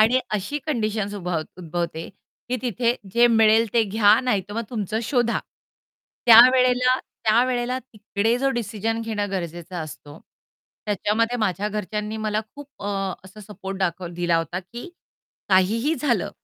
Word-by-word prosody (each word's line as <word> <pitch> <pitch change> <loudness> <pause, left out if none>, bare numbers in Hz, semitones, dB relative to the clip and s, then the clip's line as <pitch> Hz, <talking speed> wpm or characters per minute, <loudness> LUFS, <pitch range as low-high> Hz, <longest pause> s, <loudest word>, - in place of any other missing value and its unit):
आणि 235 +4 +5
अशी 210 +9 -2
कंडिशन्स 215 -7 -1
उभ 180 -3 -5 0.3
उद्भवते, 170 -1 -4 0.4
की 255 - 0
तिथे 240 0 0 0.2
जे 235 +2 +5
मिळेल 225 -1 +4
ते 235 - +4
घ्या 210 +1 +4
नाहीतर 205 -6 -1
मग 230 - -1
तुमचं 215 -1 -2
शोधा. 235 0 +1 0.9
त्यावेळेला 250 +2 +7
त्यावेळेला 245 +3 0
तिकडे 220 -1 -2
जो 270 +1 +1
डिसिजन 225 0 -2
घेणं 210 -3 -3
गरजेचं 175 -1 -5
असतो. 155 -2 -8 0.7
त्याच्यामध्ये 215 +3 0
माझ्या 205 -1 0
घरच्यांनी 210 +1 -4
मला 215 0 0
खूप 290 0 -10 0.2
अ, - - -4 0.4
असा 195 +3 -13
सपोर्ट 195 -2 -7
दाखव 180 -1 -1
दिला 175 -1 +1
होता, 170 +2 -3
की 235 - -10 0.6
काहीही 215 - +3
झालं, 240 - 0
215 Hz, 135 wpm, -23 LUFS, 195-240 Hz, 0.9 s, त्यावेळेला